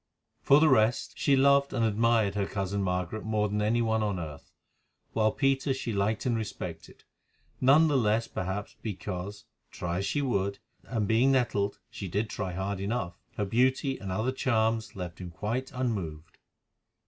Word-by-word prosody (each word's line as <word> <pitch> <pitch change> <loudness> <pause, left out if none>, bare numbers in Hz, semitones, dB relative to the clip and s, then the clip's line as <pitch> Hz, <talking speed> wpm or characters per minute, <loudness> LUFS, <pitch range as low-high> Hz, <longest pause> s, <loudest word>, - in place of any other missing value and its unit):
For 140 - +6
the 160 - +5
rest, 120 -4 +3
she 140 - +4
loved 140 +1 +4
and 115 -3 +1
admired 110 -1 +2
her 100 -1 -1
cousin 100 0 -2
Margaret 90 +2 -2
more 105 -1 +1
than 105 +1 -1
any 115 +3 +2
one 110 -1 +1
on 105 -3 0
earth, 75 -4 -8 0.6
while 110 -1 +3
Peter 135 +1 +1
she 120 -3 -3
liked 100 +2 0
and 120 -2 +2
respected, 90 -7 -6 0.6
none 140 +5 +6
the 150 - +1
less 110 0 +1
perhaps 95 +3 -4
because, 100 0 -5 0.2
try 90 -2 -3
as 100 - -2
she 145 - 0
would—and, 100 0 -2
being 120 +5 +4
nettled, 105 -6 +1
she 100 - -6
did 105 +5 -2
try 95 -3 -3
hard 95 +2 -3
enough—her 100 -1 -3
beauty 130 +5 +1
and 95 -2 -5
other 110 +7 0
charms 115 -3 0
left 90 -3 -6
him 90 -2 -6
quite 110 +9 -3
unmoved. 95 -11 -4
110 Hz, 160 wpm, -29 LUFS, 95-120 Hz, 0.6 s, For